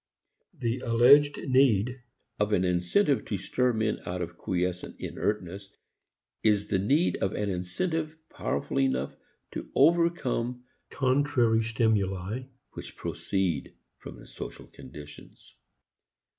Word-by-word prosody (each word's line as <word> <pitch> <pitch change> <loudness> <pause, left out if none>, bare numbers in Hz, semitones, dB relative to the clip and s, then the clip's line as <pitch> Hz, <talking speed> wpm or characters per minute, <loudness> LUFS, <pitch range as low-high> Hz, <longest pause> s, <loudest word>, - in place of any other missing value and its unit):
The 120 -1 -1
alleged 135 +5 +5
need 130 -2 +3 0.4
of 105 0 +1
an 90 - +3
incentive 90 - +2
to 100 - -2
stir 125 +6 0
men 110 -2 -1
out 90 +1 -4
of 85 0 -7
quiescent 90 0 -3
inertness 100 -1 -3 0.7
is 105 -2 +2
the 95 - +1
need 145 - +2
of 95 - -1
an 105 -1 -1
incentive 155 - -2
powerful 70 - -2
enough 65 0 0 0.4
to - - -6
overcome 150 -8 +2 0.3
contrary 130 -4 +2
stimuli 110 -1 0 0.3
which - - -10
proceed 95 -7 -2 0.2
from - - -10
the - - -13
social - - -9
conditions. 75 -1 -13
110 Hz, 115 wpm, -28 LUFS, 90-130 Hz, 0.7 s, alleged